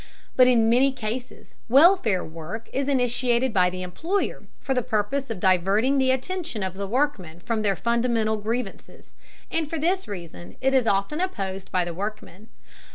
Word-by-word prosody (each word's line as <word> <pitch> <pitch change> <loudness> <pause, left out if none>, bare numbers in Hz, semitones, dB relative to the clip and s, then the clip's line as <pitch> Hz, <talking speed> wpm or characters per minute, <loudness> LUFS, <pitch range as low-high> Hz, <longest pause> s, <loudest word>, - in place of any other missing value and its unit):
But 255 -1 +6
in 235 -3 +4
many 255 +4 +4
cases 245 0 -6 0.2
welfare 270 - +5
work 165 +8 -8
is 275 0 -1
initiated 245 -2 +1
by 180 -2 +4
the 185 0 -6
employer 330 - -2 0.2
for 270 - -2
the 250 - +1
purpose 230 +5 -1
of 225 -5 -4
diverting 195 +9 +2
the 260 -1 +2
attention 265 - -2
of 190 -1 -3
the 200 +1 -5
workmen 205 - -1
from 225 +4 -2
their 200 -2 +1
fundamental 230 +1 0
grievances, 220 0 -5 0.4
and 320 -3 -1
for 325 - -3
this 360 +5 0
reason 165 - -8
it 265 +1 +1
is 255 -4 +3
often 200 - 0
opposed 195 - -4
by 180 -1 +1
the 175 - -5
workmen. 210 +1 -6
230 Hz, 165 wpm, -24 LUFS, 195-265 Hz, 0.4 s, But